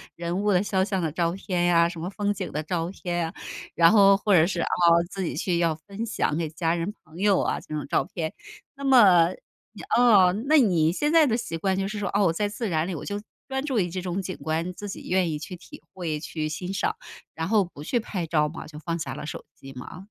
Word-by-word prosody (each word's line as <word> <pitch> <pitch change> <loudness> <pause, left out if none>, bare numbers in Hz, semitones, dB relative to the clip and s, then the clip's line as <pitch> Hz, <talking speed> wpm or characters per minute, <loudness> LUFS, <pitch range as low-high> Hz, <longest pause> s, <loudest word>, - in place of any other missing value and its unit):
人 175 +3 -3
物 205 -3 +3
肖 190 -2 +1
像 190 -3 -1
的 160 -2 -1
照 170 +1 0
片 180 -2 -1
呀， 170 -1 +4
什 170 - -8
么 175 +3 -4
风 205 0 -1
景 190 -2 -5
的 155 +1 -3
照 165 +1 -2
片 175 -2 -4
呀， 165 0 -2 0.4
然 165 +2 +6
后 200 -2 +7
或 205 0 +1
者 170 -1 +6
是， 175 -3 -2
啊， - - -1 0.4
自 195 -1 -4
己 - - -3
去 175 -3 0
要 165 -2 +2
分 200 +8 -7
享 160 -8 -1
给 165 -2 -1
家 165 +1 -1
人、 170 +5 -3
朋 160 +1 -16
友 200 0 +3
啊， - - -1
这 155 - -8
种 150 - -3
照 135 - +1
片。 160 -2 -4 0.4
那 280 - -10
么， 190 -10 +6 0.4
你 205 - -10 0.2
嗯， 210 -2 +5
那 310 0 +6
你 170 -9 +3
现 295 +9 0
在 325 -2 +6
的 225 - +1
习 165 -8 -4
惯 190 +2 0
就 195 0 -1
是 210 -1 -4
说： 200 - -2
“哦， 200 -1 +4
我 - - +3
在 205 +4 0
自 210 +1 -4
然 160 +1 0
里， 185 - -3
我 - - -6
就 205 0 -4 0.3
专 265 +2 -2
注 260 -7 0
于 175 -2 0
这 185 +1 -4
种 185 +1 -3
景 185 0 -6
观， 165 +3 -2
自 205 +2 -8
己 195 - -8
愿 185 -2 +2
意 150 - -2
去 180 - -7
体 165 - -13
会、 160 -5 -3
去 155 -2 -4
欣 180 +5 -5
赏”， 190 - -1 0.4
然 160 +1 -3
后 210 -4 +3
不 150 -4 -11
去 240 +8 0
拍 190 -6 -4
照 150 -2 +2
嘛？ 160 - -8
就 150 -1 -11
放 170 +1 -3
下 - - -4
了 - - -6
手 - - -6
机 135 0 -12
吗？ 180 +9 -9
180 Hz, 270 characters per minute, -25 LUFS, 165-205 Hz, 0.4 s, 后